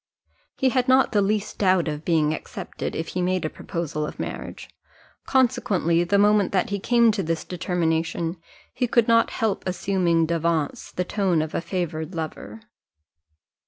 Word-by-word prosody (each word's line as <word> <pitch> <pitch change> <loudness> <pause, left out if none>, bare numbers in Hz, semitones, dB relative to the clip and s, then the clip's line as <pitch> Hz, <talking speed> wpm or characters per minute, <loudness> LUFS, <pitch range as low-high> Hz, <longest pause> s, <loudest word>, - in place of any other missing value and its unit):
He 265 - +3
had 255 0 +1
not 260 +1 +4
the 210 - +3
least 210 +1 -1
doubt 185 -4 +3
of 150 0 -4
being 155 -3 +2
accepted, - - -6
if 160 - -3
he 180 - -2
made 180 -1 0
a 155 - -2
proposal 160 -3 -4
of 150 - -6
marriage; - - -6 0.6
consequently, 200 -10 +2
the 200 +4 +2
moment 205 -1 +4
that 190 0 +1
he 200 - -1
came 235 +2 +4
to 205 -2 -2
this 165 -2 -2
determination, 165 -1 -1 0.4
he 250 - 0
could 235 -1 +3
not 230 0 +4
help 220 -3 -1
assuming 180 -3 +1
d'avance 165 -2 -1
the 180 - -2
tone 185 -5 +1
of 155 - -7
a - - -1
favoured 170 -2 -4
lover. 165 +7 -6
180 Hz, 160 wpm, -24 LUFS, 165-210 Hz, 0.6 s, not